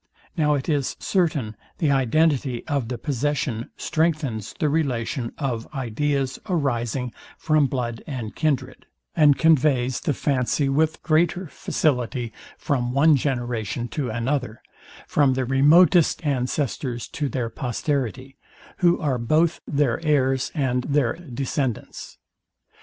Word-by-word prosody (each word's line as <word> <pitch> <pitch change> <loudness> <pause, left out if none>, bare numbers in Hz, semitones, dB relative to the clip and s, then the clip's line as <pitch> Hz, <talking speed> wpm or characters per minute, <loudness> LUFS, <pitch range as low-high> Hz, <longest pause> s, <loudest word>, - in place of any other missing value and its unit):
Now 150 -3 +2
it 135 - -3
is 145 -4 0
certain 155 - 0 0.2
the 150 -4 +1
identity 135 -1 +1
of 140 -6 -1
the 125 0 -4
possesion 135 -3 -2
strengthens 150 -10 -1
the 155 - +1
relation 130 -5 -1
of 120 -5 -3
ideas 135 +2 -1
arising 125 -6 -1 0.2
from 155 -2 +2
blood 120 -3 -3
and 120 -7 -5
kindred, 150 -4 -2 0.3
and 145 -3 +5
conveys 135 -6 +3
the 145 - -1
fancy 135 0 0
with 155 +3 +1
greater 170 +3 +2
facility 125 -6 -1 0.2
from 125 -5 -1
one 150 +3 +5
generation 120 -4 -2
to 140 -5 -3
another, 120 +1 -2 0.4
from 140 -3 +2
the 130 -1 0
remote 145 +7 +5 0.3
ancestors 125 -2 -2
to 145 -2 -3
their 120 -4 -3
posterity, 130 +1 -3 0.4
who 175 -1 +3
are 135 -5 0
both 155 +8 +2
their 140 -1 0
heirs 135 -4 +1
and 130 -4 +1
their 140 -5 +1
descendants. 135 -5 -4
135 Hz, 120 wpm, -23 LUFS, 120-150 Hz, 0.4 s, and